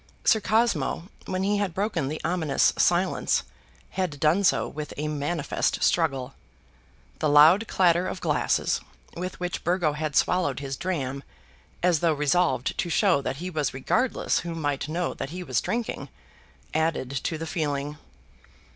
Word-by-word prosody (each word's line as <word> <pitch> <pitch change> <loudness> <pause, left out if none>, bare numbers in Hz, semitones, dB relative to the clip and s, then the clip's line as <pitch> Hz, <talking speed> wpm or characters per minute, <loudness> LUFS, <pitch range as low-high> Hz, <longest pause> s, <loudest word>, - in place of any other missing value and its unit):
Sir 220 - +4
Cosmo, 190 - +1 0.2
when 185 0 -1
he 205 +1 +1
had 195 -5 -2
broken 190 -8 -1
the 155 +3 -4
ominous 160 -4 +2
silence, - - +2 0.5
had 180 -6 -2
done 160 +6 +3
so 190 - +3
with 150 0 -7
a 150 +1 -2
manifest 150 +1 -1
struggle. 135 -6 +1 0.9
The 155 - +1
loud 160 +9 +6
clatter 175 -1 +3
of - - -4
glasses - - +1 0.3
with 180 +2 -5
which 180 0 -3
Burgo 175 -4 +1
had 150 0 -3
swallowed 180 -8 +2
his 135 -1 -4
dram, 140 -6 -3 0.6
as 175 -3 +3
though 165 -1 +2
resolved 150 -1 +1
to 175 - 0
show 170 -4 +3
that 135 - -3
he 180 +6 -5
was 150 -5 -1
regardless 245 - +1
who 170 -1 -5
might 145 -2 -2
know 175 +2 -1
that 135 - -5
he 180 +3 -6
was 130 -8 0
drinking, 235 -1 -3 0.6
added 160 -5 0
to 160 - -1
the 165 - -5
feeling. 150 -3 -3
165 Hz, 155 wpm, -26 LUFS, 145-180 Hz, 0.9 s, loud